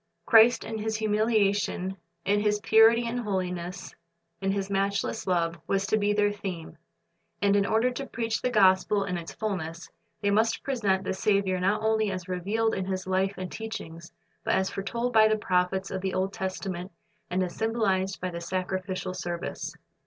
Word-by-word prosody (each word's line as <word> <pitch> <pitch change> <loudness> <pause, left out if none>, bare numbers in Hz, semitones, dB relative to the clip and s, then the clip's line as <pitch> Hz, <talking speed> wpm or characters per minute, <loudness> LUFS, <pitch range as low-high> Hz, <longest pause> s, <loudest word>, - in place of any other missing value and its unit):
Christ 230 +1 +6
in 220 -1 -5
His 220 +1 -2
humiliation, 210 -3 +1 0.3
in 205 +1 +3
His 210 0 +1
purity 225 +3 +5
and 235 +1 -2
holiness, 180 -4 -3 0.5
in 195 0 +1
His 195 -1 -1
matchless 200 0 -1
love, 170 -2 0
was 195 0 +1
to 205 - +2
be 205 0 +2
their 205 0 +2
theme. 190 -5 -6 0.6
And 200 0 +3
in 200 -1 +3
order 225 +3 +2
to 270 +2 -5
preach 225 -1 -2
the 250 - +1
gospel 200 -2 +4
in 190 -2 -3
its 170 -1 -5
fulness, 175 -6 -4 0.3
they 200 - +1
must 220 +2 +2
present 205 -8 0
the - - -2
Saviour 195 -1 +1
not 195 +4 +1
only 220 -1 +2
as 185 -2 -5
revealed 205 +5 0
in 190 - -2
His 185 -1 -3
life 190 +1 0
and 185 -1 -5
teachings, 170 -7 -7 0.3
but - - +1
as 190 0 0
foretold 235 +5 -2
by 220 -1 +7
the 215 0 +2
prophets 190 -1 0
of 190 - -3
the 190 0 -2
Old 190 +1 0
Testament 185 -1 -4 0.4
and 185 +1 +1
as 175 -1 -4
symbolized 200 -4 0
by 185 0 -3
the 170 0 -6
sacrificial 185 +1 -3
service. 175 -1 -4
195 Hz, 175 wpm, -27 LUFS, 185-215 Hz, 0.6 s, by